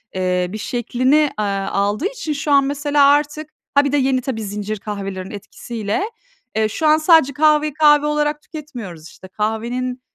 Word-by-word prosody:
eee, 180 -1 0
bir 215 - -6
şeklini, 245 +4 0 0.2
eee, - - +1
aldığı 200 - -1
için 325 -10 -4
şu 290 +1 -3
an 280 -1 +6
mesela 285 0 +2
artık, 295 +1 +1 0.3
ha, 285 0 +5
bir 280 - 0
de 290 - +2
yeni 260 -1 +1
tabii 240 -4 -4
zincir 205 +1 -4
kahvelerinin 195 -3 -6
etkisiyle, 220 - -4 0.5
eee, 220 0 +2
şu 310 +8 -1
an 305 +1 +6
sadece 315 -4 +4
kahveyi 300 0 +3
kahve 295 -1 +5
olarak 300 0 0
tüketmiyoruz. 235 - -9
İşte, 190 - -14
kahvenin, 235 +5 -3
255 Hz, 165 wpm, -19 LUFS, 210-295 Hz, 0.5 s, an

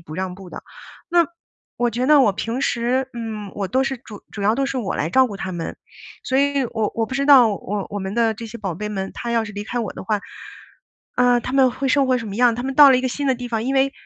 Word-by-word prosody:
不 155 -2 -10
让 185 +1 -3
步 190 -1 -12
的。 - - -8 0.5
那 345 0 +4 0.5
我 240 0 +1
觉 245 +3 -2
得 300 -1 +6
我 210 -6 +4
平 230 +6 -3
时， 250 +2 0
嗯， 220 -4 -6
我 195 -2 -3
都 260 +6 +1
是 270 0 -2
主 215 -4 -12
主 205 - -6
要 215 +3 +3
都 275 - 0
是 270 - -3
我 205 -6 -3
来 155 - -1
照 260 +5 +5
顾 205 - -7
它 190 -1 -5
们。 170 -2 -5 0.5
所 260 - 0
以 280 -1 +2
我 215 -2 -1
我 225 -1 0
不 260 - -6
知 275 +1 0
道， 265 -5 +8
我 200 -1 -4
我 205 - -4
们 190 +1 -4
的 230 -1 +2
这 230 - -8
些 230 +1 -9
宝 195 -6 -4
贝 210 +5 -5
们， 195 -2 -4
它 235 - -5
要 230 -1 +1
是 210 - -8
离 205 0 -5
开 240 +3 -4
我 225 -5 -3
的 - - -8
话， 210 +1 -1 1.0
呃， 245 -1 +4
它 255 - -6
们 265 -1 +4
会 270 +2 -4
生 270 0 +3
活 255 -1 +3
什 230 - -6
么 200 - -6
样？ 240 +1 +3
它 245 - -4
们 270 0 -3
到 290 -1 +9
了 260 - +5
一 - - +1
个 255 - -1
新 285 +3 -3
的 260 - +2
地 245 - -6
方， 225 -2 -2
因 265 - -1
为 270 +1 +2
235 Hz, 305 characters per minute, -21 LUFS, 205-260 Hz, 1.0 s, 到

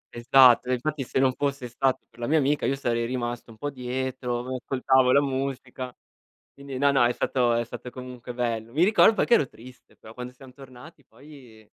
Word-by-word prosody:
Esatto. 125 +1 +5
E - - +2
infatti 145 +3 -2
se 125 - -4
non 130 -1 +3
fosse 140 -2 -3
stato 130 +2 -1
per - - -23
la 120 - -3
mia 160 +2 +3
amica 145 0 +1
io 135 - +1
sarei 120 -3 -1
rimasto 120 -1 -4
un 110 - -14
po' 145 +5 -4
dietro, 125 -1 -3
mi 130 +1 -5
ascoltavo 130 -1 +2
la 140 - +5
musica. 130 -2 -4 0.6
Quindi, 140 -2 -8
no, 140 +1 +3
no, 130 -3 +4
è 120 - +1
stato 120 -2 +1
è 120 0 +1
stato 120 +1 -9
comunque 125 -1 -9
bello. 115 -1 -3
Mi 160 - +3
ricordo 220 +2 +5
che 240 - +4
ero 140 - +2
triste, 125 +2 -16
però 110 - -14
quando 125 +1 -8
siam 130 0 -15
tornati 135 +2 -15
poi 130 -8 -16
130 Hz, 205 wpm, -25 LUFS, 120-135 Hz, 0.6 s, Esatto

